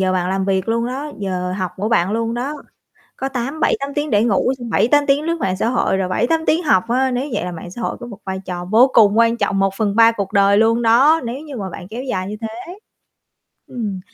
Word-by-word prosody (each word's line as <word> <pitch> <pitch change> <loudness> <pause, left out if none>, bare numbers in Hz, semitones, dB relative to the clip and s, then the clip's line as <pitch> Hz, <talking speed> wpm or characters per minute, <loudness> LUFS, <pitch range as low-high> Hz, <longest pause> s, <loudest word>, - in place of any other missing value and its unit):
giờ 190 -1 +1
bạn 180 -1 0
làm 190 0 -1
việc 190 +1 -1
luôn 230 +1 0
đó, 275 +4 -5
giờ 180 -2 -3
học 185 -2 -3
của 205 +3 -2
bạn 195 -5 +2
luôn 230 +1 -1
đó, 260 +5 -3 0.6
có 270 - -3
tám 270 +4 -4
7-8 280 -2 0
tiếng 295 0 -1
để 210 -3 +3
ngủ, 235 +2 +2
xong 240 -2 -6
7-8 285 +6 +3
tiếng 280 +2 +2
lướt 335 +1 -1
mạng 185 -1 -1
xã 225 - 0
hội, 235 -5 +1
rồi 190 -1 -1
7-8 245 - +1
tiếng 330 +3 +2
học 190 - +3
á. 260 +2 +1
Nếu 255 +4 -2
vậy - - -1
là 180 - -4
mạng 175 +1 -8
xã 240 - -8
hội - - -3
có 240 - -8
một 210 -5 -9
vai 190 0 -4
trò 180 -1 -5
vô 230 +8 +4
cùng 210 -1 +5
quan 230 0 +3
trọng, 195 -3 0
1/3 205 +3 +3
cuộc 200 -4 -4
đời 200 0 +4
luôn 225 +2 +3
đó, 260 +8 +4
nếu 240 +3 -4
như 295 -2 -9
mà 195 -3 -4
bạn 175 - -9
kéo 230 +5 -6
dài 190 -8 -3
như 210 - -5
thế. 240 - -7 0.9
Ừm. 210 -6 -4
230 Hz, 245 wpm, -19 LUFS, 195-255 Hz, 0.9 s, cùng